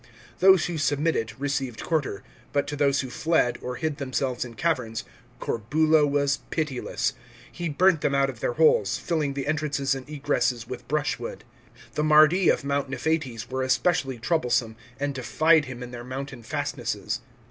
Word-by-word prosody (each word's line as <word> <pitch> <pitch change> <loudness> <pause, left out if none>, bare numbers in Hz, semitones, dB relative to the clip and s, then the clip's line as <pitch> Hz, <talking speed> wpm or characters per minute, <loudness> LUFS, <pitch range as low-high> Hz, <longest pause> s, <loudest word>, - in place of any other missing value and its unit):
Those 190 -2 +6
who 170 -3 -3
submitted, 145 -6 0
received 135 -4 -2
quarter; 150 -11 -1 0.3
but 140 -1 +2
to 145 - -3
those 140 -1 +2
who 130 -2 -7
fled, 155 -2 +1
or 125 0 -4
hid 155 +1 -2
themselves 130 -2 -2
in 120 -2 -9
caverns, 125 -9 -1 0.4
Corbulo 155 +7 +2
was 140 0 +1
pitiless. 155 -6 -1 0.4
He 175 -1 -4
burnt 175 +1 +3
them 140 - +1
out 140 0 +3
of 130 -4 -7
their 120 - -1
holes, 120 -9 +3
filling 150 -5 -1
the 140 -1 -3
entrances 145 -2 0
aiid 135 0 -6
egresses 135 -5 0
with 125 -1 -7
brush 150 0 0
wood. - - -6 0.5
The 150 - 0
Mardi 155 +4 +6
of - - +2
Mount 140 -1 -1
Niphates 135 -6 -2
were 130 0 -1
especially 130 0 +1
troublesome, 120 -4 0 0.2
and 145 0 -1
defied 155 +4 +3
him 125 -1 -7
in 125 - -8
their 120 -1 -7
mountain 130 0 -6
fastnesses. 110 - -3
140 Hz, 165 wpm, -26 LUFS, 125-155 Hz, 0.5 s, Those